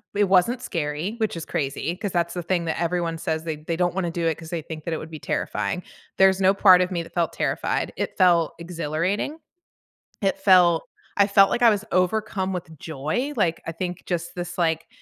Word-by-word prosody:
it 205 - +3
wasn't 195 +7 +3
scary, 160 +5 -3
which 210 -6 0
is 160 - -5
crazy, 145 +4 -2
'cause 205 0 -4
that's 170 -1 0
the 175 - -4
thing 175 -1 0
that 165 +1 -2
everyone 170 -1 -1
says 160 -1 -2
they 160 -2 -2
they 155 +2 -4
don't 180 0 +1
wanna 175 -3 -1
do 170 -1 -1
it 160 - +1
'cause 165 -1 -10
they 170 -2 -3
think 155 0 -8
that 170 - -2
it 160 - -1
would 155 - -8
be 155 - -7
terrifying. 180 -2 -2 0.3
There's 190 0 +5
no 190 +1 +5
part 185 -2 +6
of 180 +1 0
me 175 -2 -1
that - - -15
felt 170 -2 0
terrified. - - -1
It - - -3
felt 175 -4 +4
exhilarating, 170 - -2 0.8
it 195 -1 +1
felt 180 -4 +5 0.3
I 200 0 +5
felt 195 -1 +6
like 245 - 0
I 235 - +8
was 210 -1 0
overcome 190 +1 0
with 160 -3 -6
joy, 160 - -3
like, 165 -2 +1
I - - -2
think 175 +1 -5
just 175 -1 -3
this, 175 0 -5
like 165 -2 0
175 Hz, 215 wpm, -24 LUFS, 165-190 Hz, 0.8 s, I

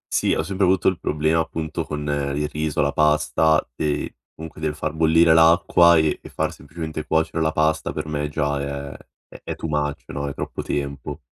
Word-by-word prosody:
Sì, - - +2
ho - - 0
sempre 95 +4 -2
avuto 95 +1 +3
il 95 - -5
problema, 80 +2 +1
appunto, 80 0 -3
con 75 -1 -5 0.3
il 75 0 -1
riso, 75 -1 -1
la 70 - +1
pasta, 75 +1 +2
ehm, 75 +1 -1 0.3
comunque 80 -1 -10
del 75 -1 -1
far 75 0 -3
bollire 80 +1 +4
l'acqua, 85 +1 +5
e 80 -1 +1
e - - -11
far - - -2
semplicemente 80 +1 -6
cuocere 80 +1 0
la 80 0 +2
pasta 80 0 0
per - - -4
me 75 -1 -3
già 75 -1 -1
è 70 0 -5 0.3
è - - -14
è - - -5
too - - -5
much 75 -1 -2
no, 70 0 -4
è 70 - -5
troppo - - -5
tempo. 70 -1 -4
80 Hz, 195 wpm, -22 LUFS, 75-80 Hz, 0.3 s, l'acqua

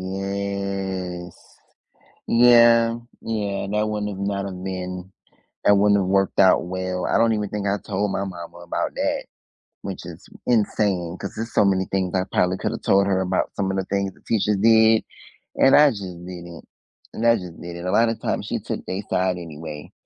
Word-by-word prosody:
yes. 95 -2 -4 0.9
Yeah, 115 -1 +6 0.2
yeah. 105 -3 -3
That 105 +1 0
wouldn't 105 -1 -2
have 95 - -7
not 100 -1 -2
have 95 -2 -6
been 90 0 -5 0.5
that 100 - +6
wouldn't 100 0 +4
have 95 - -1
worked 95 0 +1
out 95 -1 +5
well. 95 0 -3
I - - +1
don't 115 0 +4
even 105 -2 -1
think 105 0 -4
I 100 +1 +1
told 100 0 -2
my 100 - -1
mama 85 -2 -8
about 85 0 -3
that, - - -1 0.6
which 95 -3 -6
is 85 +1 -10 0.2
insane 100 -6 +1
'cause 100 - -6
there's 115 +1 -5
so - - +4
many 95 -1 +2
things 95 -2 -2
I 95 -1 +1
probably 90 +1 +2
coulda - - -3
told 100 0 +3
her 95 -1 +1
about, 95 0 -1
some 95 -1 -1
of 95 - -2
the 95 - -1
things 100 -1 -2
the - - -23
teachers 105 -2 +1
did, 110 +1 +5 0.5
and 135 - +5
I 150 0 +7
just 105 -7 -5 0.2
didn't, 85 -2 -9 0.5
and 115 - -3
I 115 0 +5
just 90 -2 -9
didn't. 85 +1 -7
A - - 0
lotta 115 +2 +3
times, - - -3
she - - -2
took - - -5
they 95 +2 -3
side 90 -1 +1
anyway, 80 -3 -8
95 Hz, 185 wpm, -23 LUFS, 90-105 Hz, 0.9 s, I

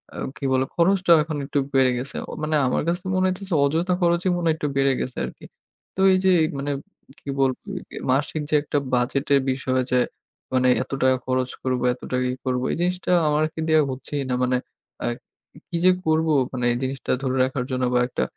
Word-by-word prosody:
আ - - -8 0.2
কি 140 - -5
বলে 130 0 +2
খরচটাও 175 -1 +4
এখন 155 -2 -4
একটু 145 0 0
বেড়ে 130 -1 +4
গেছে। 130 +3 -6 0.3
মানে 155 0 0
আমার - - +1
কাছে 175 +2 -1
মনে 185 - +2
হয়তেছে 190 +1 -4
যে - - +3
অযথা 165 +6 +1
খরচই 175 +2 +2
মনে 170 - -1
হয় 160 - +4
একটু 150 - -2
বেড়ে 135 0 +3
গেছে 130 - -5
আরকি। - - -10 0.5
তো - - -8
এই - - +4
যে 190 - +6 0.3
মানে 145 +1 -2 0.5
কি 140 - -10
বলবো 130 -2 +2 0.5
মাসিক 145 +3 0
যে 150 - +2
একটা 145 - -1 0.2
বাজেটের 140 +3 +2
বিষয় 130 0 0
যে 125 - +4 0.5
মানে 130 0 +3 0.2
এত - - -18
টাকা 130 0 +4
খরচ 130 0 0
করব, 130 -2 0
এত 125 - -15
টাকা 125 0 +1
ই - - -5
করব 125 -1 0
এই - - -3
জিনিসটা 180 +1 -1 0.2
আমাকে 155 +2 0
দেওয়া 155 -1 +5
হচ্ছেই 135 +2 -4
না। - - 0
মানে 125 0 +2 0.5
আ - - -1 0.6
কি 170 - -2
যে 185 - +8
করব 160 0 +2 0.3
মানে 125 -1 -2
এই 120 - 0
জিনিসটা 135 +1 -3
ধরে 130 0 0
রাখার 130 -1 -1
জন্য 130 0 -1
বা 125 - +4
একটা - - -2
140 Hz, 205 wpm, -23 LUFS, 130-165 Hz, 0.6 s, যে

